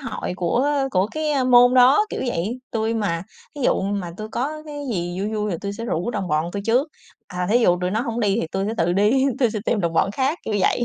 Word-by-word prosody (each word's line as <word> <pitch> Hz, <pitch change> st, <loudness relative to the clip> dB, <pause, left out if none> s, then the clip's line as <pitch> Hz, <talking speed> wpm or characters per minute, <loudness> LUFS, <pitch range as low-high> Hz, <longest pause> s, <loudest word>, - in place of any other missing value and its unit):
hội 265 Hz, -8 st, -4 dB
của 210 Hz, +11 st, +1 dB, 0.2 s
của 185 Hz, -1 st, +2 dB
cái, 310 Hz, +2 st, -2 dB
ơ, 270 Hz, -2 st, +1 dB
môn 245 Hz, 0 st, +6 dB
đó, 260 Hz, +12 st, +6 dB
kiểu -, -, -4 dB
vậy. 225 Hz, +2 st, -2 dB
Tui 225 Hz, 0 st, -1 dB
mà 175 Hz, -7 st, -1 dB, 0.3 s
thí 290 Hz, -, -8 dB
dụ -, -, +2 dB
mà 195 Hz, -3 st, -2 dB
tui 215 Hz, +1 st, -6 dB
có 295 Hz, +7 st, -3 dB
cái 290 Hz, -1 st, -6 dB
gì 175 Hz, -1 st, -3 dB
vui 205 Hz, +2 st, -2 dB
vui 210 Hz, -1 st, -1 dB
thì 175 Hz, -, -2 dB
tui 200 Hz, 0 st, -4 dB
sẽ 230 Hz, +3 st, -6 dB
rủ 185 Hz, -2 st, -2 dB
đồng 200 Hz, -5 st, -3 dB
bọn 155 Hz, 0 st, +1 dB
tui 200 Hz, -, -4 dB
trước, 250 Hz, +7 st, +2 dB, 0.4 s
à, 180 Hz, -1 st, -3 dB
thí 235 Hz, -, +5 dB
dụ 180 Hz, -7 st, +3 dB
tụi 180 Hz, 0 st, -1 dB
nó 215 Hz, +3 st, 0 dB
hổng 235 Hz, -1 st, -3 dB
đi 205 Hz, -1 st, +2 dB
thì -, -, -2 dB
tui 195 Hz, 0 st, -1 dB
sẽ 220 Hz, -, -2 dB
tự 175 Hz, -, +1 dB
đi, 210 Hz, +8 st, +3 dB
tui 245 Hz, -4 st, +3 dB
sẽ 215 Hz, -, -3 dB
tìm 220 Hz, -, +1 dB
đồng 170 Hz, -2 st, -1 dB
bọn 180 Hz, +4 st, +2 dB
khác, 270 Hz, -, -1 dB
kiểu 215 Hz, -, -2 dB
vậy. 240 Hz, -, +2 dB
215 Hz, 265 wpm, -22 LUFS, 190-250 Hz, 0.4 s, môn